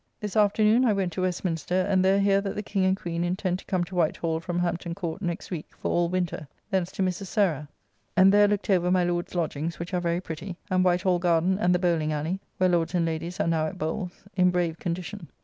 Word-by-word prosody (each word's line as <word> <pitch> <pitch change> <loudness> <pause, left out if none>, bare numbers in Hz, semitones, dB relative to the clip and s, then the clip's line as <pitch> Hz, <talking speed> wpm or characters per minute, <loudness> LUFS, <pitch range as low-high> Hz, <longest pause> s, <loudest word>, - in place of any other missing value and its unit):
This 210 -1 -5
afternoon 215 +3 +4
I 230 -4 +4
went 190 -4 -1
to 185 - -3
Westminster; 180 -1 -1
and 190 -2 +3
there 190 +1 +4
hear 195 0 +3
that 195 -1 -4
the 210 - -3
King 195 -2 0
and 190 0 +2
Queen 170 -2 -3
intend 180 +1 -1
to - - -14
come 185 -2 0
to 185 - -9
White 170 -4 +1
Hall 160 -1 -1
from 175 +1 -4
Hampton 175 -1 -2
Court 175 0 -4
next 175 -1 -4
week, 165 -4 -4
for - - -2
all 175 0 +2
winter. 175 -4 -2 0.2
Thence 190 -2 0
to 195 - -1
Mrs. 185 +1 -2
Sarah, 175 -8 +1 0.5
and 190 +1 +7
there 205 0 +6
looked 205 0 0
over 180 -2 +3
my 180 0 +3
Lord's 175 0 -2
lodgings, 165 -1 -2
which 170 +3 -6
are 180 - +1
very 170 0 0
pretty; 175 +1 -7
and 185 0 +3
White 180 0 +2
Hall 180 -2 +2
garden 175 +2 +2
and 180 -2 +3
the - - +4
Bowling 170 -4 +1
ally 155 +5 -2 0.2
(where 185 0 +3
lords 170 +1 +1
and 170 -1 +2
ladies 165 +2 -4
are - - +2
now 160 -1 +1
at - - -7
bowles), 175 +4 -4
in 180 -1 +4
brave 175 -2 -1
condition. 175 +1 -4
180 Hz, 240 wpm, -26 LUFS, 170-190 Hz, 0.5 s, and